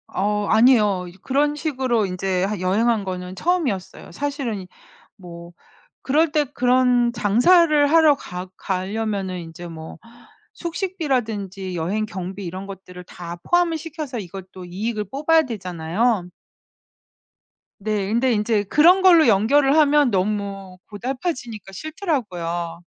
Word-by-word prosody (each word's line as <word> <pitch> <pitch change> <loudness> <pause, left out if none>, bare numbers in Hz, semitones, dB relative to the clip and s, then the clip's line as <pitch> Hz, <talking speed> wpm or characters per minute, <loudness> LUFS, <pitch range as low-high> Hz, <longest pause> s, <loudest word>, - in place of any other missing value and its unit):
어우 210 +1 0
아니에요. 215 -5 +4
이제 175 +1 -13
그런 290 +2 +1
식으로 260 -8 0
인제 185 0 -1
하 205 0 -3
여행한 210 +4 +1
거는 185 -1 -5
처음이었어요. 280 - -2
사실은 270 -10 -4 0.5
뭐 170 -2 -11 0.5
그럴 310 +4 +2
때 300 -1 +2
그런 250 -1 +3
장사를 290 - +4
하러 315 -2 +5
가 180 -6 -7
가려면은 195 -1 -3
인제 170 +1 -9
뭐 160 0 -9 0.6
숙식비라든지 240 - -3
여행 195 +7 -1
경비 190 +1 -6
이런 185 +3 -6
것들을 185 -2 -10
다 175 -1 -8
포함을 350 -2 +3
시켜서 310 -5 -6
이것도 185 -1 -9
이익을 210 +4 -3
뽑아야 315 +4 +3
되잖아요. 190 - -1 1.5
네. 205 -1 -2
근데 240 +3 +2
인제 210 -1 +1
그런 340 - +5
걸로 345 -5 +7
연결을 270 +7 +4
하면 295 -3 +4
너무 195 -1 -2
고달파지니까 240 - -5
싫더라고요. 180 - -4
215 Hz, 290 characters per minute, -22 LUFS, 185-280 Hz, 1.5 s, 걸로